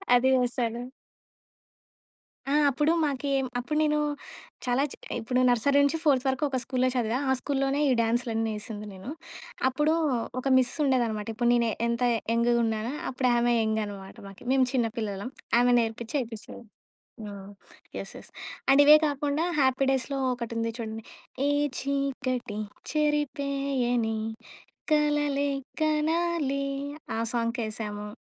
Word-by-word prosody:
అదీ 255 +2 +4
వేసాను. 240 -1 -1 1.7
ఆ! - - +1 0.2
అప్పుడు 295 +4 +2
మాకి, 280 -1 -2 0.3
అప్పుడు 275 +5 -2
నేను 300 -1 +2 0.7
చాలా 250 +2 +2
చి - - -7 0.2
ఇప్పుడు 250 +3 0
నర్సరీ 245 +4 +3
నుంచి 285 +3 +2
ఫోర్త్ 275 -5 +3
వరకు 265 +2 0
ఒక 265 - -1
స్కూల్‌లో 255 +1 0
చదివా. 240 0 0
ఆ - - +4
స్కూల్‌లోనే 275 +1 0
ఈ - - +4
డ్యాన్స్‌లన్నీ 225 -1 0
ఏసింది 210 -1 -7
నేను. 190 +6 -9 0.6
అప్పుడు 295 +4 +2 0.5
ఒక 255 - -8
మిస్ 255 -2 +2
ఉండేదనమాట. 235 -6 +1
ఇప్పుడు 235 +2 +1
నేను 235 -1 +3 0.2
ఎంత 235 +1 -1 0.3
యంగ్‌గా 235 +1 +3
ఉన్నానో, 225 +2 -1 0.2
అప్పుడు 255 -1 0
ఆమె 240 0 +3
యంగనమాట 205 -3 -3
మాకి. 195 +4 -13
మేము 265 -1 +4
చిన్న 240 -3 +2
పిల్లలం. 205 0 -3 0.3
ఆమె 245 0 +4
నేర్పించి, 230 +3 -3
ఏపిస్తాది. 225 0 -9 0.7
ఆ! - - -7 0.7
యెస్. - - -6
యెస్. - - -13 0.4
అండ్ 275 +1 +7
ఇవే 300 +1 +10
కాకుండా, 290 +2 -1 0.2
'హ్యాపీ 265 0 +3
డేస్‌లో' 270 +1 -1
ఒకటుంది 230 -1 -3
చూడండి, 225 -1 -5 0.4
ఏ - - +3 0.3
చీకటి 260 -5 -2 0.3
చెరిపేయని 275 -6 0 0.8
కలలే 295 -1 +2 0.3
కనాలి 310 -2 +1 0.5
ఆ - - -2 0.2
సాంగ్‌కేశాము. 220 -3 -3
250 Hz, 125 wpm, -27 LUFS, 230-280 Hz, 1.7 s, ఇవే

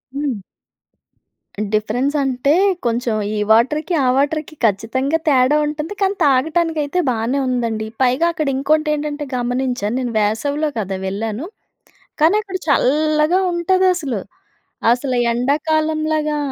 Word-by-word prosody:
హ్మ్. 280 -6 -2 1.3
డిఫరెన్స్ 240 +7 0
అంటే 265 +1 0 0.3
కొంచెం 235 0 0 0.2
ఈ - - -2
వాటర్‌కి, 295 +10 +2
ఆ - - +2
వాటర్‌కి 310 +2 -1
ఖచ్చితంగా 230 +8 0
తేడా 265 +1 +4
ఉంటుంది. 300 +4 -4
కానీ 390 +1 +2
తాగటానికైతే 310 +3 +1
బానే 235 +4 -1
ఉందండి. 230 -3 -1
పైగా 260 +5 +3
అక్కడ 310 -4 -2
ఇంకోటెంటంటే 300 +1 0
గమనించాను 245 -3 -1
నేను 245 -2 -3
వేసవిలో 285 +9 0
కదా 195 -2 -3
వెళ్ళాను. 220 - -4 0.8
కానీ 330 +6 +5
అక్కడ 385 -2 -5
చల్లా‌గా 305 +5 +2
ఉంటాదసలు. 345 - +1 0.7
అసలు 250 +1 -1 0.2
ఎండాకాలంలాగా 310 +3 0
280 Hz, 105 wpm, -19 LUFS, 245-310 Hz, 1.3 s, కానీ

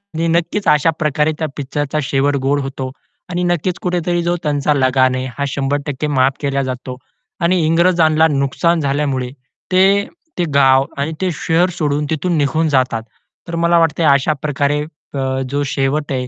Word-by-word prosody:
आणि 165 +1 0
नक्कीच 170 +5 0
अशा 150 +2 +4
प्रकारे 150 0 +1
त्या 160 - -1
पिक्चरचा 145 +2 -2
शेवट 140 +1 +1
गोड 145 +1 +2
होतो. 135 -1 -5 0.4
आणि 180 0 -2
नक्कीच 175 0 -1
कुठेतरी 175 -1 -1
जो 175 +1 0
त्यांचा 145 0 +1
लगान 130 -1 +2
आहे 130 - -3
हा 140 - -1
100% 140 +1 -2
माफ 135 -2 +2
केला 140 -1 0
जातो. 125 0 -5 0.4
आणि 180 +2 +3
इंग्रजांना 165 -1 +3
नुकसान 150 +4 +1
झाल्यामुळे 140 -3 -1 0.4
ते, 195 +2 +4 0.3
ते 175 - +1
गाव 135 -1 +5
आणि 145 +3 -1
ते 185 - +1
शहर 175 +3 +1
सोडून 150 -1 0
तिथून 160 +2 -1
निघून 155 +2 +1
जातात. 130 -5 +1 0.4
तर 170 - -4
मला 170 0 +4
वाटतंय 165 0 +1
अशा 140 +2 +3
प्रकारे 145 0 0 0.3
अ, 135 -1 -1
जो 145 +1 -1
शेवट 140 +2 -1
आहे 125 -2 -2
145 Hz, 160 wpm, -17 LUFS, 135-165 Hz, 0.4 s, गाव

